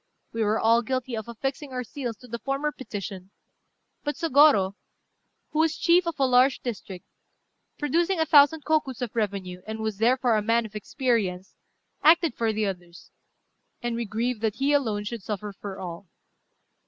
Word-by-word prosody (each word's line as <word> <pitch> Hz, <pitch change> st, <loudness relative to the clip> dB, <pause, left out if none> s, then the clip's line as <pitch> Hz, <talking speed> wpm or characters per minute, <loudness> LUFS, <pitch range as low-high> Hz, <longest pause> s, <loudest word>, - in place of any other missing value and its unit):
We 225 Hz, -, -2 dB
were 215 Hz, +1 st, +1 dB
all 230 Hz, +1 st, +4 dB
guilty 255 Hz, +1 st, -3 dB
of 220 Hz, 0 st, -5 dB
affixing 270 Hz, +4 st, -4 dB
our 250 Hz, -1 st, -3 dB
seals 240 Hz, -2 st, -5 dB
to 250 Hz, -, -15 dB
the 235 Hz, 0 st, -5 dB
former 275 Hz, +3 st, -1 dB
petition; 195 Hz, -8 st, -7 dB, 0.7 s
but 295 Hz, 0 st, -2 dB
Sôgorô, 285 Hz, -, +4 dB, 0.8 s
who 305 Hz, -, -1 dB
was 320 Hz, 0 st, +2 dB
chief 345 Hz, 0 st, +3 dB
of 335 Hz, -, -2 dB
a 270 Hz, -, +4 dB
large 255 Hz, +1 st, +4 dB
district, 200 Hz, -6 st, -6 dB, 0.7 s
producing 335 Hz, +5 st, +1 dB
a 320 Hz, -, +3 dB
thousand 295 Hz, 0 st, +5 dB
kokus 285 Hz, -6 st, 0 dB
of 240 Hz, -, -5 dB
revenue, 195 Hz, -4 st, -2 dB
and 220 Hz, 0 st, -4 dB
was 220 Hz, -2 st, -3 dB
therefore 245 Hz, 0 st, +3 dB
a -, -, +1 dB
man 230 Hz, +2 st, +2 dB
of 215 Hz, -1 st, -11 dB
experience, 210 Hz, -5 st, -1 dB, 0.5 s
acted 330 Hz, -1 st, +5 dB
for 230 Hz, -2 st, 0 dB
the 215 Hz, 0 st, -1 dB
others; 175 Hz, -3 st, -7 dB, 0.7 s
and 240 Hz, -1 st, -1 dB
we 235 Hz, 0 st, -2 dB
grieve 230 Hz, +3 st, -2 dB
that 220 Hz, -2 st, -1 dB
he 280 Hz, +2 st, +1 dB
alone 220 Hz, -8 st, +1 dB
should 225 Hz, +1 st, -5 dB
suffer 205 Hz, +1 st, -5 dB
for 195 Hz, 0 st, -8 dB
all. 180 Hz, +1 st, -7 dB
235 Hz, 170 wpm, -26 LUFS, 210-275 Hz, 0.8 s, thousand